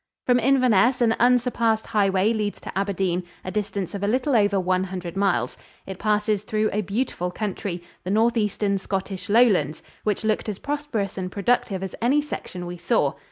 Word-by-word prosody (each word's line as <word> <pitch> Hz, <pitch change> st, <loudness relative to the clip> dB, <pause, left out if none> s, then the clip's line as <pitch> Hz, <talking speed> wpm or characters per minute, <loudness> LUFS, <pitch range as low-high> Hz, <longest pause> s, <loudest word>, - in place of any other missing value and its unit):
From 245 Hz, -1 st, +4 dB
Inverness 250 Hz, -1 st, +4 dB
an 225 Hz, -2 st, +4 dB
unsurpassed 240 Hz, -2 st, +2 dB
highway 200 Hz, +1 st, +2 dB
leads 210 Hz, -2 st, -2 dB
to -, -, -8 dB
Aberdeen, 190 Hz, -2 st, 0 dB, 0.2 s
a 185 Hz, -, -3 dB
distance 200 Hz, -3 st, -3 dB
of 200 Hz, -, -4 dB
a 200 Hz, -, 0 dB
little 255 Hz, +5 st, +1 dB
over 205 Hz, -2 st, +3 dB
one 185 Hz, 0 st, +1 dB
hundred 180 Hz, -2 st, -6 dB
miles. 185 Hz, -12 st, 0 dB, 0.3 s
It 190 Hz, -1 st, -7 dB
passes 210 Hz, -1 st, +1 dB
through 215 Hz, 0 st, 0 dB
a 210 Hz, -, +1 dB
beautiful 200 Hz, -3 st, -2 dB
country, 185 Hz, -2 st, -4 dB, 0.2 s
the 185 Hz, -, -5 dB
northeastern 210 Hz, -2 st, +1 dB
Scottish 195 Hz, +1 st, -4 dB
Lowlands, 200 Hz, -, +3 dB, 0.2 s
which 210 Hz, -1 st, -1 dB
looked 215 Hz, 0 st, 0 dB
as 205 Hz, -, -3 dB
prosperous 285 Hz, -10 st, -3 dB
and 185 Hz, -1 st, -4 dB
productive 200 Hz, -2 st, 0 dB
as 190 Hz, -, -5 dB
any 260 Hz, +6 st, +3 dB
section 185 Hz, -11 st, -5 dB
we 175 Hz, 0 st, -6 dB
saw. 155 Hz, -5 st, +1 dB
205 Hz, 170 wpm, -24 LUFS, 190-230 Hz, 0.3 s, From